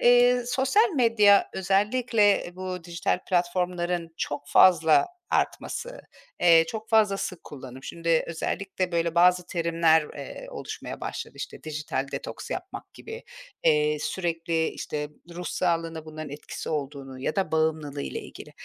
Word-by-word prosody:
eee, 245 0 +5
sosyal 265 - +3
medya, 210 -5 +5
özellikle 205 +1 +2
bu 185 -2 -5
dijital 170 0 -1
platformların 175 -1 0
çok 145 0 -4
fazla 165 - +6 0.3
artması, - - -2 0.4
eee, 165 -2 +7
çok 220 -1 -6
fazla 215 -3 +4
sık 185 -3 -5
kullanım, 130 -2 -10
şimdi 165 +2 0
özellikle, 185 +2 -3
böyle, 170 0 0
bazı 180 +1 +4
terimler, 165 -2 +3
eee, - - -8
oluşmaya 485 - -7
başladı. - - -5
İşte, - - -7
dijital 150 -3 -3
detoks - - -6
yapmak - - -6
gibi, 450 +2 -9 0.4
eee, 150 -1 +3
sürekli, 165 -1 -1
işte, 150 -1 -4 0.3
ruh 180 - -6
sağlığına 165 -3 -1
bunların 155 -2 -8
etkisi 145 +1 -7
olduğunu 140 -3 -4
ya 155 - -2
da 190 -4 0
bağımlılığıyla 155 -3 -1
ilgili. - - -11
170 Hz, 130 wpm, -26 LUFS, 155-200 Hz, 0.4 s, eee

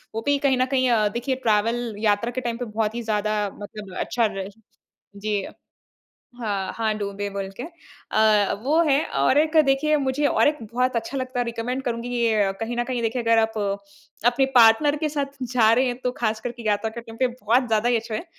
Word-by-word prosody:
वो 225 - -2
भी 285 0 +3
कहीं 265 -2 +3
न 255 - +2
कहीं 260 -1 +3
अ, 215 -3 +3
देखिए 240 +5 -2
ट्रैवल 225 +2 +1
यात्रा 215 +2 +1
के 255 +1 -4
टाइम 235 -2 -3
पे 245 - -4
बहुत 215 0 -2
ही 240 - -3
ज़्यादा 215 -1 -1 0.2
मतलब 205 -2 -9
अच्छा 235 -2 0
रह 195 0 -4 0.7
जी। 205 -1 -2 1.0
हाँ, 200 -4 -2
हाँ 220 -1 -1
डूबे 200 0 -4
बोल 195 -1 -4
के - - -6
अ, 220 - 0
वो 305 +6 +2
है 295 -2 +2 0.2
और 260 - +4
एक 315 +1 +2
देखिए 285 +3 +2
मुझे 280 +1 0
और 285 - +3
एक 300 0 -1
बहुत 250 +1 +1
अच्छा 230 +4 -3
लगता 255 -1 -3
है 245 - +1
रिकमेंड 235 +3 -3
करुँगी 240 -1 -3
ये 220 -5 +1
कहीं 235 +2 -3
न 240 - 0
कहीं 245 -2 -3
देखिए 235 +2 -1
अगर 230 0 +3
आप 220 -1 +1 0.7
अपने 245 +2 +3
पार्टनर 245 +5 +6
के 305 0 -1
साथ 280 -1 -3
जा 235 -3 +3
रहे 255 +3 +3
हैं। 245 -1 -1
तो 250 - +2
ख़ास 220 -2 0
करके 240 0 -6
यात्रा 210 +1 0
करने 225 0 -9
पे 260 - +2 0.2
बहुत 245 +4 +3
ज़्यादा 225 +1 +1
ही 245 - +3
अच्छा 225 0 -4
है। 270 - -3
235 Hz, 210 wpm, -23 LUFS, 215-255 Hz, 1.0 s, पार्टनर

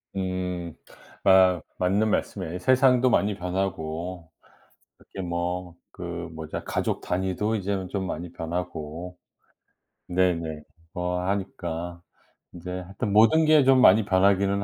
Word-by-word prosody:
음. 90 -3 -3 0.5
아 95 -2 +5 0.2
맞는 100 +4 +1
말씀이에요. 90 -3 -2
세상도 130 +4 +4
많이 105 -4 +2
변하고 90 -2 -4 0.7
그렇게 95 - -11
뭐 85 0 -3 0.2
그 - - -8
뭐지 85 -2 -6
가족 - - -1
단위도 95 +4 -1
이제는 95 -2 -2
좀 95 -1 -3
많이 85 0 -5
변하고 85 0 -5 0.9
네네. 85 -4 0 0.3
뭐 90 0 -2
하니까 85 -3 -4 0.5
이제 90 +1 -8
하여튼 95 +4 -4
모든 115 +10 +5
게 155 -3 +5
좀 130 -1 +5
많이 105 -1 +6
변하기는 100 +1 +2
90 Hz, 240 characters per minute, -25 LUFS, 85-100 Hz, 0.9 s, 많이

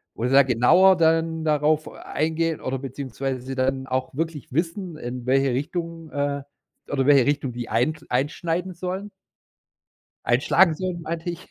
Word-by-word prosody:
wo 115 - -3
sie 125 - 0
da 140 0 +8
genauer 155 +10 +5
dann 160 0 +2
darauf 150 +1 +2
eingehen 160 +1 -2
oder 130 0 -3
beziehungsweise 135 -1 -5
dann 130 +1 -1
auch 130 0 -2
wirklich 160 -2 -4
wissen, 170 +1 -2
in 120 -2 -6
welche 135 +1 +3
Richtung, 165 +3 -4
äh 140 -1 -2 0.5
oder 135 -2 0
welche 140 -4 +6
Richtung 140 -3 0
die 120 -1 -6
eint 135 +7 0
einschneiden 165 +7 -1
sollen? 185 +4 -5 1.1
Einschlagen 155 +8 +4
sollen, 180 0 -4
meinte 165 +2 -4
ich. 170 +1 -9
150 Hz, 145 wpm, -24 LUFS, 130-165 Hz, 1.1 s, da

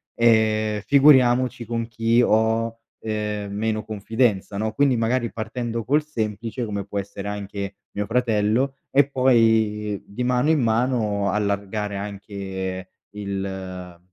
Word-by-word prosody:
ehm, 110 -2 +3
figuriamoci 130 -2 +4
con 115 0 -3
chi 115 +1 +2
ho, 115 +1 +1 0.2
ehm, 105 -2 -3
meno 110 +1 -1
confidenza, 110 -1 -1
no? 110 +1 -1
Quindi 135 0 +3
magari, 115 +1 0
partendo 115 0 -4
col 145 +6 +2
semplice, 115 -4 -3
come 100 -2 -3
può 100 0 -6
essere 100 0 -5
anche 100 -1 -5 0.2
mio 105 0 -3
fratello 120 +3 +1
e 140 0 +4
poi, 110 -6 +2
di 105 +5 -4
mano 125 +4 +2
in 160 -1 +4
mano, 110 -3 +1
allargare 100 0 -2
anche 95 -2 -5 0.2
il 95 -3 -6
110 Hz, 125 wpm, -23 LUFS, 100-120 Hz, 0.2 s, figuriamoci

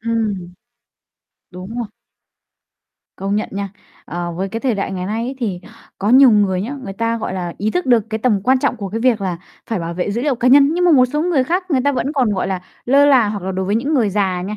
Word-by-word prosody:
Ừm. 215 -6 -2 1.0
Đúng 185 +5 -9
rồi. 235 - -2 1.3
Công 195 +1 -2
nhận 210 - -2
nha. 200 0 -3 0.4
Ờ, 175 0 -4
với 190 +3 -3
cái 225 +4 -5
thời 255 -4 0
đại 195 -1 -3
ngày 185 -1 -4
nay 220 +3 -2
ấy 260 - -4
thì 200 -8 -3 0.4
có 200 - -1
nhiều 260 0 +8
người 200 -4 +2
nhá, 255 +7 -4
người 195 - -5
ta, 230 +2 -1
gọi 220 - -4
là, 175 -2 -4
ý 210 +3 0
thức 360 +7 -2
được 240 -4 +4
cái 220 - -2
tầm 220 -3 +1
quan 260 +4 +3
trọng 250 - 0
của 200 -3 -5
cái 225 +4 -4
việc 240 -3 +2
là 185 -3 -2 0.3
phải 225 -4 -2
bảo 170 0 -4
vệ 180 +3 -2
dữ 235 +4 -2
liệu 285 -1 +1
cá 245 +1 +1
nhân, 280 +2 +7
nhưng 355 - +1
mà 350 - +5
một 255 -3 +6
số 300 +4 -2
người 325 -7 +1
khác, 360 +5 -2
người 270 -4 +2
ta 285 - +3
vẫn 255 +3 -2
còn, 260 -7 +1
gọi 185 - -1
là, 190 -2 -2 0.2
lơ 280 +3 +5
là 255 -7 +5
hoặc 205 -2 -4
là 190 - -3
đối 190 0 -2
với 205 - 0
những 275 +7 0
người 225 -7 +2
già 190 -3 0
nha, 210 +3 -5
220 Hz, 260 wpm, -18 LUFS, 195-255 Hz, 1.3 s, nhiều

